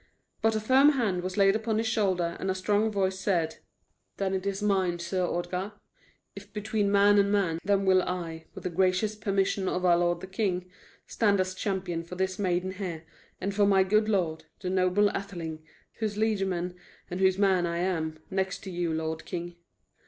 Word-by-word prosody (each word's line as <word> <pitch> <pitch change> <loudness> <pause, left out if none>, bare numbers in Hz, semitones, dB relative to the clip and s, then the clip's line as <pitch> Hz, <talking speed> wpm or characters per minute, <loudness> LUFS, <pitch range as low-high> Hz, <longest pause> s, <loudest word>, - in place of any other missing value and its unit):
But 225 0 +2
a - - +1
firm 265 +7 +5
hand 210 -9 0
was 185 +2 -5
laid 195 0 +5
upon 220 0 -1
his 225 - 0
shoulder, 190 -6 +1
and 190 - -2
a 190 - 0
strong 205 +3 +1
voice 190 -2 0
said: 175 -5 0 0.6
"Then 195 -1 -1
is 195 +1 -2
it - - +1
mine, 190 -4 +1
Sir 175 +2 -2
Ordgar. 180 +3 -2 0.6
If 200 +1 -11
between 210 -1 -1
man 205 0 +5
and 200 0 +3
man, 185 -6 +1
then 200 0 +2
will 185 -1 +5
I, 170 -3 -4
with - - -8
the 180 - -2
gracious 185 +4 +1
permission 195 -2 0
of 180 0 -1
our 175 -1 +6
lord 175 0 +1
the - - -5
king, 185 -2 -2 0.3
stand 205 -3 +2
as 185 0 0
champion 185 -4 -2
for 170 +2 -9
this 190 +2 -2
maiden 185 -1 0
here 185 -4 -5 0.4
and 200 - -2
for 200 0 +3
my 195 -1 +5
good 215 +3 +2
lord, 170 -6 0 0.2
the 185 -1 -2
noble 190 +2 +3
Atheling, 165 -5 -5 0.4
whose 215 -2 -2
liegeman 195 -5 0 0.4
and 180 - -3
whose 190 -1 +3
man 190 -3 +3
am 170 -2 -1
I, 155 - -23
next 190 0 -2
to 190 - -6
you, 175 -1 -1
lord 160 0 -3
king." 175 0 -5
190 Hz, 190 wpm, -28 LUFS, 180-200 Hz, 0.6 s, our